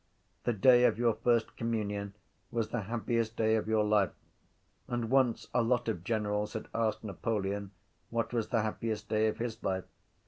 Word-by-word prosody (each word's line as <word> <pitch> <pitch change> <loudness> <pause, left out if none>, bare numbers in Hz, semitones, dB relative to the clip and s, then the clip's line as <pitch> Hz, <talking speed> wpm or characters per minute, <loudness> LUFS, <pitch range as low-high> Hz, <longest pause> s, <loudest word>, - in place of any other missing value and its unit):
The 120 - +2
day 120 +4 +6
of - - +3
your 120 -1 +3
first 115 +1 +1
communion 105 -3 -2 0.3
was 115 -2 -1
the 120 - -1
happiest 115 -1 -1
day 110 0 +3
of 110 - -1
your 110 -1 +3
life. 105 -2 +3 0.8
And 120 -1 -2
once 130 -3 +3
a 125 - +4
lot 120 +1 +1
of 105 -7 -2
generals 105 -1 -1
had 110 - -5
asked 115 -2 0
Napoleon 100 -1 -2 0.4
what 115 0 -1
was 115 -3 0
the 115 -3 +1
happiest 110 -1 -3
day 110 0 +3
of 110 - -1
his 115 -1 -4
life. 95 -1 -1
110 Hz, 175 wpm, -31 LUFS, 105-115 Hz, 0.8 s, day